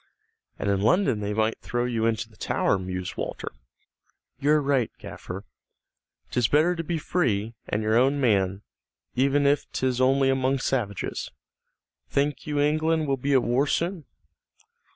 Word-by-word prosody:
"And - - -3
in 100 -1 +1
London 125 - +3
they 105 0 -2
might 110 +1 0
throw 120 0 -2
you 115 -2 0
into 110 -1 -1
the 110 - -22
Tower," 95 - 0
mused 90 0 -5
Walter. - - -4 0.9
"You're 150 +2 +4
right, 140 -4 +1
gaffer. - - -8 0.9
'Tis 125 -3 +2
better 160 +7 +3
to 165 - -3
be 170 +1 -2
free, 115 - 0 0.2
and 105 +1 -1
your 110 +1 +2
own 135 +3 +3
man, 100 -6 +1 0.5
even 140 +2 +2
if 145 0 +2
'tis 130 -1 0
only 135 +1 +4
among 135 +1 +1
savages. 120 -7 -2 0.8
Think 145 +1 -1
you 145 -1 -1
England 155 +2 +2
will 135 - +2
be 140 +2 0
at 130 - +4
war 130 +5 +2
soon?" 170 +1 -1
130 Hz, 150 wpm, -26 LUFS, 110-145 Hz, 0.9 s, You're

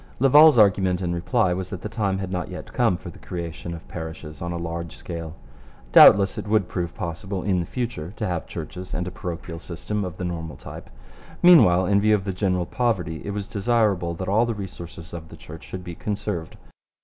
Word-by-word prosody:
Laval's 145 +3 +7
argument 95 -4 +4
in 90 -2 -2
reply 90 +3 +1
was 95 0 -4
that 95 - -7
the - - -2
time 105 -4 -1
had 95 -1 -4
not 90 -3 -3
yet - - -8
come 90 - +2
for 85 - -9
the - - -15
creation 85 -1 -6
of 80 - -12
parishes 80 -2 -8
on 85 0 -3
a 85 - -3
large 85 0 -5
scale. 85 -2 -7 0.6
Doubtless 100 0 +8
it - - -6
would 105 -3 +2
prove 85 -2 -4
possible 95 0 -4
in 95 -3 +1
the 85 - -3
future 115 -10 -4
to 105 - -3
have 90 -4 -3
churches 90 0 -6
and 90 0 -2
a - - -4
parochial 85 -3 -6
system 100 +5 -4
of 90 -2 -6
the 90 - -4
normal 80 -4 -4
type. - - -10 0.5
Meanwhile, 95 - +7
in 100 +1 +3
view 110 +1 +4
of 100 - -2
the 95 -1 -3
general 90 -2 0
poverty 90 -9 -1
it - - -5
was 100 0 -3
desirable 100 -5 +1
that 95 +2 -5
all 110 +5 +3
the 115 - -2
resources 85 -4 -8
of 80 -2 -8
the - - -12
Church 80 +1 -11
should 95 -1 -7
be 85 -1 -7
conserved. 100 -3 -4
90 Hz, 210 wpm, -24 LUFS, 85-105 Hz, 0.6 s, Doubtless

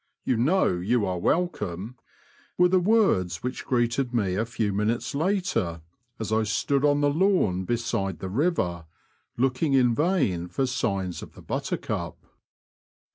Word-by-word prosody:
You 125 - +1
know 130 - +2
you 105 +4 +1
are 90 -1 -2
welcome," 110 - -1 0.6
were 180 0 +5
the 185 +1 +4
words 175 - +2
which 125 +1 -4
greeted 120 +1 0
me 100 -6 +1
a 110 +4 -1
few 110 -3 -1
minutes 105 +7 -1
later, 160 - -1 0.4
as 110 -1 -4
I 110 - +3
stood 135 +6 0
on 145 0 +3
the 145 - +3
lawn 150 - +2
beside 100 -5 -1
the 95 - -6
river, 95 - -1 0.5
looking 135 +4 +1
in 125 -3 +4
vain 135 - +1
for 110 +10 -1
signs 100 -8 -2
of - - -10
the - - -13
Buttercup. - - -3
120 Hz, 145 wpm, -26 LUFS, 95-145 Hz, 0.6 s, were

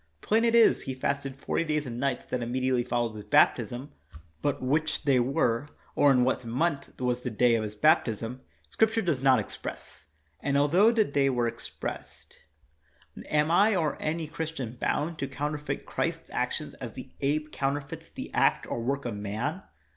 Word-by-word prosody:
Plain 225 +2 +2
it 230 0 +3
is 230 -1 +6
He 130 - -5
fasted 135 0 -2
forty 135 - -1
days 150 -2 -1
and 120 -2 -5
nights 135 -1 -1
that 125 - -3
immediately 125 +1 0
followed 120 -2 -1
His 105 -1 -8
baptism, 130 +7 +2 0.5
but 145 - 0
which 150 +5 0
they 140 -3 +4
were, 125 0 +1 0.3
or 145 - +5
in 125 -2 +4
what 130 0 0
month 140 +6 -2
was 125 -1 0
the 125 - -4
day 120 +2 +3
of 115 - +2
His 105 0 -5
baptism, 125 -3 +2 0.3
Scrip 220 0 +3
ture 225 - +1
does 160 -8 0
not 135 -1 +5
express; 110 - -7 0.3
and, 140 0 0
altho 175 +10 +5
the 225 -2 +3
day 140 -1 +2
were 125 -2 0
28 115 - +1
KNOX - - -14
expressed, - - -8 0.9
am 150 +1 +2
I 205 +5 +5
or 160 -4 -1
any 160 +1 -1
Christian 155 -7 -5
bound 155 +6 -1
to 135 - -2
coun 145 +2 -3
terfeit 150 -2 -4
Christ's - - -3
actions - - -2
as - - -8
the - - -9
ape 150 +2 0
counterfeits 140 +1 -3
the - - -8
act - - +3
or 120 - -3
work 135 +3 -2
of 120 -3 -3
man 110 - -3
140 Hz, 185 wpm, -28 LUFS, 125-155 Hz, 0.9 s, is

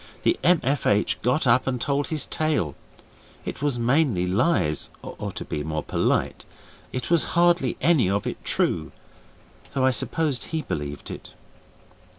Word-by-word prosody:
The 350 - +2
M.F.H. 140 - +2
got 125 +6 +2
up 125 +2 +4
and 125 -2 0
told 140 +3 0
his 155 -2 0
tale: 150 - 0 0.7
it - - -5
was 145 -4 +1
mainly 120 - +2
lies, 90 - +1
or, - - -6
to - - -5
be 75 - -3
more 80 0 -3
polite, - - 0 0.5
it 130 +6 -4
was 170 -3 +4
hardly 175 -7 +3
any 140 - +4
of 100 +1 0
it - - -5
true, - - 0 0.8
though 130 -1 +2
I 130 - +5
supposed 145 +1 0
he 160 -1 -3
believed 75 -1 -5
it. - - -9
130 Hz, 150 wpm, -25 LUFS, 105-155 Hz, 0.8 s, I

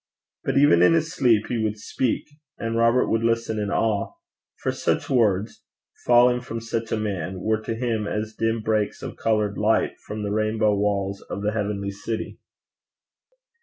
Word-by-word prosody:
But - - 0
even 135 -12 +6
in 90 - +6
his 165 +1 0
sleep 120 -10 +3
he 115 -3 -2
would 105 0 -1
speak; 115 +3 -2 0.3
and 115 0 -3
Robert 115 +2 +3
would 115 - +1
listen 115 -1 0
in 105 -1 -2
awe; 110 - 0 0.5
for - - +1
such - - -1
words, 110 -4 +1 0.4
falling 125 0 +5
from 115 -2 -5
such 115 0 -4
a - - +1
man, 95 -3 -3
were 110 +3 0
to 115 - -3
him 115 -3 -1
as 105 +1 -3
dim 115 +1 -1
breaks 110 -1 -1
of - - -6
coloured 105 -2 0
light 110 +2 +1
from 105 0 -6
the 100 - -2
rainbow 110 0 +1
walls 100 -1 -1
of 100 - -4
the 105 - +1
heavenly 100 -2 -2
city. 110 +3 -5
110 Hz, 170 wpm, -24 LUFS, 105-115 Hz, 0.5 s, even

